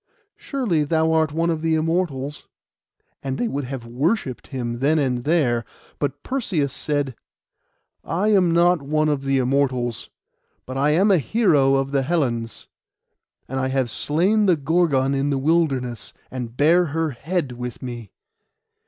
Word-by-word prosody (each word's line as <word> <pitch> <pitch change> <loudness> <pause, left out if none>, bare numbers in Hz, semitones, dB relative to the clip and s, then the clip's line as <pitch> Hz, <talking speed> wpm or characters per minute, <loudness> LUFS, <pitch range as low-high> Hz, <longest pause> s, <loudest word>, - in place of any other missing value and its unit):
Surely 225 - -1
thou 160 +2 +1
art 160 -1 +2
one 165 +2 0
of 160 -1 -2
the 160 0 +1
Immortals;' 155 -4 -2 0.7
and 135 -1 -3
they 240 - 0
would 140 - -3
have 125 -2 -6
worshipped 135 - -1
him 120 -3 -4
then 145 +4 +2
and 125 -4 0
there; 140 -8 +2 0.4
but 145 0 -3
Perseus 185 - -1
said— 145 -4 -2 0.9
'I 185 +7 0
am 190 -5 +4
not 170 0 +3
one 155 +2 +1
of 145 -2 0
the 135 0 +2
Immortals; 130 -3 0 0.6
but 130 - -7
I 140 +2 +2
am 190 +7 +4
a 185 - +5
hero 145 - +3
of 135 0 0
the 140 -1 +2
Hellens. 130 -7 -2 0.8
And 130 +1 -3
I 130 - 0
have 130 -3 0
slain 190 - +1
the 180 -3 +4
Gorgon 145 -3 +1
in 140 +1 0
the 140 - 0
wilderness, 135 -6 0 0.2
and 125 -2 -6
bear 170 +5 +4
her 160 0 -1
head 155 +2 -2
with 125 0 -7
me. 120 -4 -7
145 Hz, 155 wpm, -22 LUFS, 130-165 Hz, 0.9 s, a